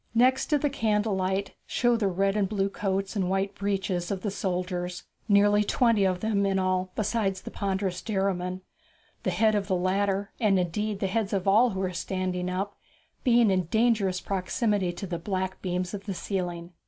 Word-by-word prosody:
Next 255 +3 +4
to 300 - +3
the 290 0 0
candle 215 -4 +1
light 190 +1 -1
show 240 -1 +2
the 220 -3 +1
red 195 +2 +1
and 200 -3 +1
blue 200 -2 0
coats 195 0 -2
and 190 -3 0
white 195 +1 0
breeches 190 -3 -2
of 195 -2 -2
the 205 - -2
soldiers 180 -2 -3 0.3
nearly 205 +1 +5
twenty 225 -1 +3
of 185 -1 0
them 215 -2 +1
in 195 -1 +1
all 185 0 0
besides 205 -3 0
the - - -7
ponderous 190 -2 -2
Derriman 190 -3 -1 0.6
the - - -1
head 220 -1 +3
of 205 -2 0
the 190 - +1
latter, 195 +2 0
and, 210 -4 +3
indeed, 200 +4 -1
the - - +1
heads 205 +1 -1
of 195 -1 -1
all 220 +6 +5
who 190 -3 -3
are 185 -1 -2
standing 180 0 -2
up, 195 +3 -2 0.5
being 235 -4 +5
in 185 -2 +1
dangerous 210 -2 +2
proximity 195 0 0
to 175 +3 -6
the 175 -2 -4
black 190 +1 -3
beams 180 0 -2
of 200 0 -6
the 195 - -2
ceiling. 175 -3 -4
195 Hz, 190 wpm, -27 LUFS, 185-210 Hz, 0.6 s, nearly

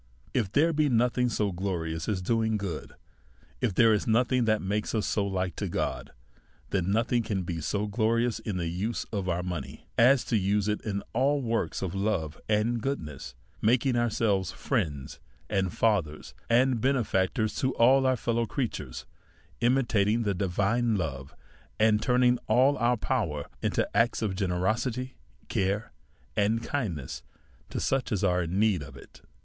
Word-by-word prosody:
If 110 -7 0
there 160 +7 +3
be 150 -1 +2
nothing 125 +1 +2
so 105 -3 0
glorious 85 -3 -3
as 95 -4 -1
doing 110 +1 +1
good, 95 -6 -5 0.7
if 115 -7 -1
there 115 +1 +6
is 105 +4 0
nothing 120 +2 +2
that 110 -1 +2
makes 105 +4 -2
us 110 - 0
so 100 -2 0
like 95 -3 -2
to - - -2
God, - - -3 0.6
then 95 -2 0
nothing 115 +3 +2
can 100 -4 -2
be 85 -2 -4
so 105 +7 -1
glorious 115 +2 +1
in 105 -4 -4
the 85 - -2
use 95 +8 -2
of 100 -4 -2
our 90 0 -1
money 90 -6 -6
as 125 +1 +6
to 115 - 0
use 100 +1 +1
it 105 0 -1 0.3
all 135 +4 +2
in 135 - -4
works 115 -3 -1
of 90 - -3
love 95 -7 -2
and 110 +2 +1
"oodness, 75 - -4 0.3
makin" 125 +3 +3
ourselves 110 -6 +1
friends, 70 -4 -3 0.5
fathers, 90 -8 0 0.2
benefactors, 115 -4 +2
to 130 - +1
all 130 +3 +5
our 130 -1 +2
fei 115 - -2
low 115 0 0
creatures, 100 - -4 0.5
imitating 120 -3 +2
the 100 -2 0
divine 105 +5 +1
love, 70 -7 -4 0.4
and 110 -1 +4
turning 125 0 +3
all 130 +6 +4
our 120 +1 +2
power 95 - -1 0.2
into - - 0
acts 115 0 +2
of 105 -3 0
generosity, 110 +7 -1 0.3
care^ 100 +3 -1 0.5
and 110 +3 +1
kind 115 - -2
ness, 65 -4 -7 0.5
to - - -3
such 135 -1 0
as 105 -2 0
are 90 -2 +2
in 85 +2 -2
need 105 -5 +3
of 70 -2 -10
it. - - -15
110 Hz, 160 wpm, -28 LUFS, 95-120 Hz, 0.7 s, there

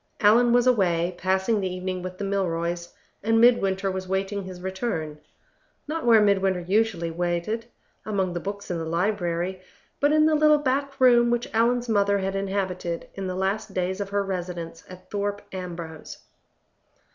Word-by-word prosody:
Allan 235 +3 +5
was 245 0 +4
away, 180 -8 +2
passing 190 +4 +1
the 190 -1 -2
evening 185 0 -4
with 185 0 -6
the 205 - -5
Milroys; 175 -3 -2 0.3
and 225 +2 +2
Midwinter 195 -5 +3
was 185 0 -5
waiting 195 +2 -1
his 185 -1 -8
return 185 -5 -3 0.7
not 315 -3 -3
where 225 -2 +7
Midwinter 195 -3 +2
usually 185 -2 0
waited, 175 +7 -2 0.4
among 195 -4 -1
the 175 - -2
books 200 +1 -6
in 170 - -2
the 165 - -3
library, 175 +1 -1 0.4
but 290 +1 +3
in 310 0 +5
the 315 - +3
little 305 0 +5
back 280 0 -1
room 240 -2 +6
which 240 0 -1
Allan's 240 +2 +2
mother 200 -2 +2
had 195 0 -2
inhabited 190 -3 -3
in 195 -1 -5
the 185 - -3
last 195 +2 -2
days 185 +2 -1
of 200 - -4
her 200 0 0
residence 175 -3 -5
at 185 0 -13
Thorpe 205 0 -2
Ambrose. 170 -4 -7
195 Hz, 165 wpm, -25 LUFS, 180-220 Hz, 0.7 s, where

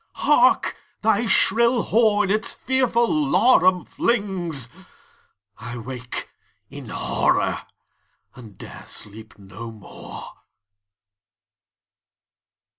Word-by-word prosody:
Hark, - - +3 0.3
thy 220 +1 +2
shrill 235 +3 +3
horn 210 -3 +2
its 215 +1 0
fearful 245 -2 +1
laram 230 - +3
flings! 185 - -1 0.9
—I 120 +1 -7
wake 125 +1 -6 0.4
in - - -9
horror, - - 0 0.7
and 110 -6 -14
'dare - - -11
sleep 110 +1 -8
no 100 +4 -9
more! 110 -3 -10
195 Hz, 80 wpm, -22 LUFS, -, 0.9 s, Hark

